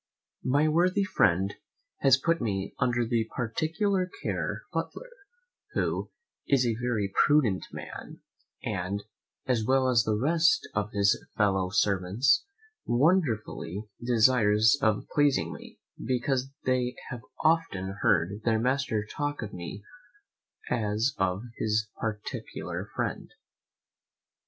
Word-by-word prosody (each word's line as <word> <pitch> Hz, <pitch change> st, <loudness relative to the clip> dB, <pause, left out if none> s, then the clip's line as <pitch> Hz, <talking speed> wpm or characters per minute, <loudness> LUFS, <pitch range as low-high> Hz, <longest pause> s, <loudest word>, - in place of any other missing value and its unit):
My 145 Hz, +4 st, +3 dB
worthy 180 Hz, +5 st, +3 dB
friend 95 Hz, -, +2 dB, 0.5 s
has 135 Hz, -2 st, +5 dB
put 165 Hz, +3 st, 0 dB
me 100 Hz, -4 st, -2 dB
under 120 Hz, -1 st, +1 dB
the 115 Hz, -1 st, 0 dB
particular 165 Hz, -, 0 dB
care -, -, -2 dB
of -, -, 0 dB
his -, -, -31 dB
butler, -, -, -9 dB, 0.6 s
who -, -, -1 dB, 0.4 s
is 135 Hz, -3 st, +3 dB
a 115 Hz, -, +2 dB
very 110 Hz, -6 st, -1 dB
prudent 130 Hz, -11 st, +2 dB
man, -, -, -8 dB, 0.4 s
and, 95 Hz, +3 st, -2 dB, 0.4 s
as 125 Hz, -4 st, +1 dB
well 130 Hz, +3 st, +3 dB
as 125 Hz, -2 st, +4 dB
the 110 Hz, -1 st, 0 dB
rest 160 Hz, +6 st, +3 dB
of 105 Hz, 0 st, -1 dB
his 100 Hz, 0 st, +2 dB
fellow 95 Hz, -3 st, +2 dB
servants, 105 Hz, -, +2 dB, 0.4 s
wonderfully 120 Hz, -, +1 dB, 0.2 s
desirous 115 Hz, -2 st, +4 dB
of 110 Hz, -3 st, +2 dB
pleasing 145 Hz, -2 st, +2 dB
me, -, -, -12 dB, 0.3 s
because 130 Hz, +2 st, 0 dB, 0.2 s
they 125 Hz, -1 st, +1 dB, 0.2 s
have 125 Hz, -2 st, -5 dB, 0.2 s
often 100 Hz, -, +1 dB
heard 100 Hz, +4 st, +2 dB
their 115 Hz, -1 st, +2 dB
master 125 Hz, -3 st, 0 dB
talk 145 Hz, +4 st, -3 dB
of 105 Hz, -, -7 dB
me 90 Hz, +3 st, -7 dB, 0.8 s
as 110 Hz, +2 st, 0 dB
of 95 Hz, +2 st, 0 dB
his 110 Hz, -1 st, 0 dB
particular 105 Hz, -2 st, -5 dB
friend. -, -, -3 dB
115 Hz, 120 wpm, -28 LUFS, 105-135 Hz, 0.8 s, has